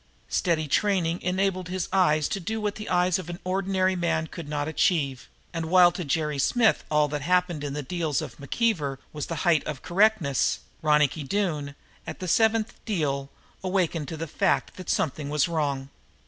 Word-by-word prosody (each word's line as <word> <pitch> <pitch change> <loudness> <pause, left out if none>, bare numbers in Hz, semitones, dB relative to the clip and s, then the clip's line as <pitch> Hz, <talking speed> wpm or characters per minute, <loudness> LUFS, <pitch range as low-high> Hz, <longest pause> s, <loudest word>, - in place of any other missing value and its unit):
Steady 160 -3 +1
training 180 0 +1
enabled 185 -1 0
his 185 -1 -2
eyes 155 -6 +3
to 195 - -2
do 220 +5 -3
what 210 -1 -1
the 215 0 -7
eyes 180 0 +2
of 180 - -7
the 175 0 -5
ordinary 190 0 +1
man 165 -2 0
could 160 -2 -8
not 145 -1 -2
achieve, 150 -5 0 0.2
and, 165 -1 -3
while 180 0 +6
to 180 - -5
Jerry 150 -1 -1
Smith 225 - +3
all 150 -1 +3
that 145 0 -3
happened 175 -1 +1
in 145 -1 -3
the 150 0 -3
deals 160 -2 -1
of 120 - -7
McKeever 145 - 0 0.2
was 150 -2 -4
the 165 - -3
height 165 -4 +4
of 150 -3 -5
correctness, 185 - +2 0.2
Ronicky 150 0 +3
Doone, 150 -4 -2 0.3
at - - -5
the 185 - -5
seventh 220 +4 +2
deal, 140 -9 -1 0.3
awakened 180 -5 0
to 160 - -5
the 165 - -3
fact 185 +5 0
that 185 - -8
something 155 -6 -1
was 150 -1 +2
wrong. 140 -5 -1
170 Hz, 180 wpm, -26 LUFS, 150-185 Hz, 0.3 s, while